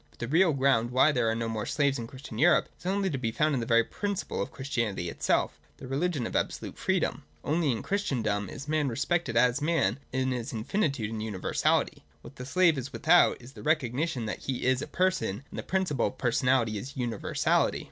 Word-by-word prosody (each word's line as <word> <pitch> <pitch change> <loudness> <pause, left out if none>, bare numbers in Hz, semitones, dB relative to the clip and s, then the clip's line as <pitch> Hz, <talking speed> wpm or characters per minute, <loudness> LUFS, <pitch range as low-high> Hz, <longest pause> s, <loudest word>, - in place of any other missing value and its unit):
But - - -26
the 120 - -4
real 165 +6 +4
ground 130 -4 +2
why 130 +5 +4
there 120 -5 +1
are 110 - 0
no 115 0 -2
more 110 -2 -3
slaves 140 -2 +1
in 115 - -5
Christian 130 -3 -9
Europe 175 +5 +4
is - - -8
only 195 +1 +1
to 135 - -2
be 115 -3 -1
found 150 +6 +1
in 135 - +1
the 115 - -4
very 115 0 +5
principle 200 - -3
of - - -3
Christianity 115 -10 -2
itself, - - 0 0.2
the - - -9
religion 145 0 -1
of - - -5
absolute - - -2
freedom. - - 0 0.2
Only 155 0 +1
in 115 - -3
Christendom 110 - -1
is 140 - -8
man 155 -1 +1
respected 130 0 -1
as 125 +3 +3
man, 150 - +1
in 130 0 0
his 125 -2 -4
infinitude 120 - -1
and 110 -1 -4
universality. 105 -4 0 0.2
What 140 - -12
the 125 - -7
slave 165 -1 +3
is 130 +2 -6
without, 170 +5 +4
is 125 +2 -13
the - - -11
recognition 140 -3 0
that 110 - -4
he 130 -2 -2
is 130 0 +2
a - - -5
person: 180 - 0
and - - -6
the - - -2
principle 185 -9 0
of 130 - -7
personality 125 -3 +1
is 135 +7 -9
universality. 120 -4 0
130 Hz, 210 wpm, -28 LUFS, 115-155 Hz, 0.2 s, very